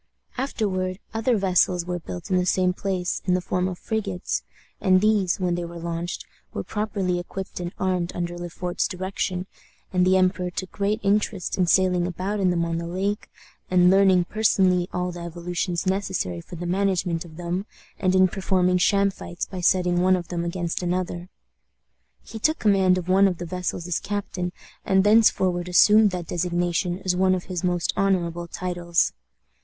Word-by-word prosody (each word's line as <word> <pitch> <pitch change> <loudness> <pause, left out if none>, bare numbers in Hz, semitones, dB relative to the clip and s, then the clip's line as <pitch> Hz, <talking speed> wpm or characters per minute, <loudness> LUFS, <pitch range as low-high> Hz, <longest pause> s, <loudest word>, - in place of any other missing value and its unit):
Afterward 190 -8 -2 0.2
other 225 +1 +1
vessels 180 -2 +2
were 180 0 -3
built 175 +3 -8
in 185 - +4
the 180 - +1
same 185 0 +2
place, 185 -2 -2
in 180 -1 +2
the - - +1
form 180 0 -1
of 180 -2 -4
frigates; 195 -4 -2 0.4
and 185 -1 +5
these, 205 -3 +2
when 180 -2 0
they 175 0 -2
were 170 0 -7
launched, 170 +1 -4 0.3
were - - -2
properly 200 -4 -2
equipped 190 +2 -6
and 175 -1 -4
armed, 185 -2 0
under 175 0 -3
Le 175 0 -6
Fort's 175 +1 -2
direction, 185 -1 -3 0.5
and 180 -1 +3
the 185 +1 +4
emperor 185 -1 +1
took 185 +1 -5
great 205 +2 -1
interest 200 -2 0
in 180 -2 +1
sailing 180 -1 +3
about 185 +4 -3
in 190 -2 +3
them 170 -1 +1
on 165 0 -2
the 170 - -5
lake, 195 +4 -2 0.4
in 180 0 +5
learning 190 -2 +5
personally 185 -4 +2
all 180 0 -2
the 175 - -8
evolutions 175 +1 -3
necessary 185 - -1
for 175 - -10
the 175 +1 -6
management 180 -2 0
of 160 -2 -13
them, 175 +3 -3 0.3
and 185 -2 +2
in 185 0 +6
performing 185 -1 +1
sham 200 +2 +3
fights 175 -2 -6
by 185 -2 -7
setting 180 0 +3
one 185 +1 +4
of 175 -3 -5
them 170 -1 -2
against 170 0 -2
another. 180 0 -2 0.9
He 225 - -8
took 310 +8 +2
command 190 -3 +3
of 180 -1 -4
one 195 +2 +5
of 180 -3 -1
the 175 - -5
vessels 180 -1 -3
as 175 - 0
captain, 190 -3 -3 0.3
and 190 0 +3
thenceforward 190 -4 +3
assumed 210 +4 +6
that 180 -2 -4
designation 175 +1 -1
as 180 -1 +2
one 185 0 +3
of 180 - -4
his 180 -2 -5
most 175 -2 0
honorable 175 -3 0
titles. 175 -1 0
180 Hz, 180 wpm, -24 LUFS, 175-190 Hz, 0.9 s, in